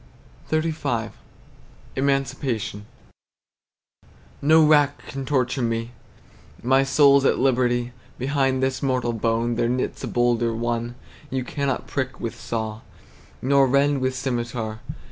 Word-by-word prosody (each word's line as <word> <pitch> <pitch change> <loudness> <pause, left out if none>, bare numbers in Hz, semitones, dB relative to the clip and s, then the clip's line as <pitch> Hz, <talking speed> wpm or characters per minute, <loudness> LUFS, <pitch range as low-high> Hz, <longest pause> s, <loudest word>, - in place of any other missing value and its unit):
XXXV. 155 -8 -1 0.8
EMANCIPATION. 135 -6 -1 1.5
No 155 +2 +6
rack 145 -2 +4
can 135 -1 -6
torture 130 -1 0
me, 115 0 -1 0.7
My 130 +2 +4
soul's 140 0 +5
at - - +3
liberty 125 -2 +1 0.3
Behind 135 0 0
this 130 0 0
mortal 130 -3 0
bone 115 +1 0
There 120 - +1
knits 125 +1 -2
a - - -2
bolder 120 -1 +1
one 120 +1 -2 0.3
You 130 -1 -2
cannot 140 +1 -2
prick 130 -2 -3
with 115 - -3
saw, 110 -1 -4 0.6
Nor 135 +1 +4
rend 140 +1 +2
with 130 0 0
scymitar. 120 -4 -3
130 Hz, 115 wpm, -23 LUFS, 120-140 Hz, 1.5 s, No